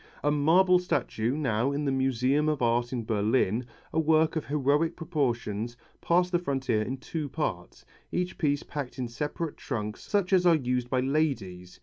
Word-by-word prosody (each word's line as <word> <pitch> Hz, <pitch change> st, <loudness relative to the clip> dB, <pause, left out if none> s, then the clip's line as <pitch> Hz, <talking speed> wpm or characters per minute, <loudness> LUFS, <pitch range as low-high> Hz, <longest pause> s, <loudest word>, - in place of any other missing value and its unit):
A 145 Hz, -, +3 dB
marble 175 Hz, +5 st, +4 dB
statue, 130 Hz, -8 st, -1 dB
now 125 Hz, -3 st, 0 dB
in 145 Hz, +1 st, -2 dB
the 140 Hz, -, +1 dB
Museum 135 Hz, +3 st, +1 dB
of 150 Hz, -2 st, 0 dB
Art 120 Hz, +1 st, +1 dB
in 120 Hz, -3 st, -2 dB
Berlin, 110 Hz, +1 st, +1 dB, 0.3 s
a -, -, +2 dB
work 160 Hz, 0 st, +3 dB
of 160 Hz, -, -3 dB
heroic 150 Hz, +3 st, +1 dB
proportions, 120 Hz, -, -2 dB, 0.2 s
passed 180 Hz, +1 st, +2 dB
the 175 Hz, -, +2 dB
frontier 135 Hz, -9 st, 0 dB
in 130 Hz, +5 st, -3 dB
two 150 Hz, +2 st, -5 dB
parts, 110 Hz, -, -4 dB, 0.3 s
each 180 Hz, +1 st, -2 dB
piece 145 Hz, -2 st, +1 dB
packed 145 Hz, -4 st, -6 dB
in 125 Hz, -2 st, -2 dB
separate 150 Hz, +6 st, -4 dB
trunks 105 Hz, -5 st, -4 dB
such 200 Hz, -2 st, 0 dB
as 185 Hz, -1 st, +5 dB
are 170 Hz, -, +6 dB
used 125 Hz, -4 st, -1 dB
by 130 Hz, 0 st, +1 dB
ladies. 125 Hz, -, -2 dB
140 Hz, 175 wpm, -28 LUFS, 120-160 Hz, 0.3 s, are